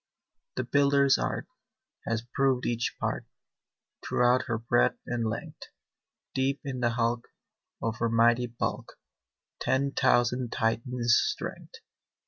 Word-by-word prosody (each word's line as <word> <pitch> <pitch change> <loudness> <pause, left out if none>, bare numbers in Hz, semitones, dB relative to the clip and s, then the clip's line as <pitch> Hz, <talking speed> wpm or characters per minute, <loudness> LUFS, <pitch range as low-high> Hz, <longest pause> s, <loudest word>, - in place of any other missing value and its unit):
"The - - -1
builder's 140 -1 +4
art - - -2 0.6
Has 115 0 -1
proved 135 -2 +2
each 120 0 -1
part - - -2 0.8
Throughout 125 +1 +2
her 115 -2 0
breadth 110 - +2
and 115 -2 -1
length; 110 - -6 0.7
Deep 135 +1 0
in 135 -2 -4
the 120 -1 +2
hulk, 115 0 -1 0.6
Of 110 -1 -1
her 115 - +1
mighty 120 +2 +3
bulk, 120 0 -4 0.7
Ten 135 +1 +1
thousand 125 -2 +2
Titans' 120 +1 +2
strength." - - -5
120 Hz, 115 wpm, -28 LUFS, 115-130 Hz, 0.8 s, builder's